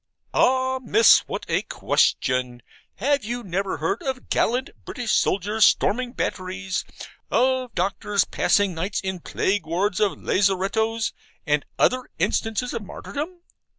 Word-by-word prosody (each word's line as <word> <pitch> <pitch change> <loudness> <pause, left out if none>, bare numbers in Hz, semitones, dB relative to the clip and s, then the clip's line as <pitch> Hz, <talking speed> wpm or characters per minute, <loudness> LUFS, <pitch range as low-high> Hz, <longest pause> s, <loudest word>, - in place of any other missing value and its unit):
Ah, 260 0 +2
Miss, 225 -2 +6
what - - -5
a - - +1
question! 125 -2 0 0.3
Have 280 +4 +1
you 240 +3 -4
never 195 0 -2
heard 165 +8 -1
of 265 -2 -4
gallant 250 +4 +1
British 245 -4 -4
soldiers 205 +3 +2
storming 245 +3 +3
batteries, 185 -3 -3 0.5
of 255 -1 +1
doctors 200 +2 0
passing 205 -2 +2
nights 185 +5 -2
in 190 -1 -3
plague 190 0 -1
wards 180 +4 0
of 210 -2 +2
lazarettos, 205 +4 +1 0.3
and 150 -2 +1
other 255 0 +2
instances 225 +2 -1
of 230 - -3
martyrdom? 315 - -7
205 Hz, 125 wpm, -24 LUFS, 185-250 Hz, 0.5 s, Miss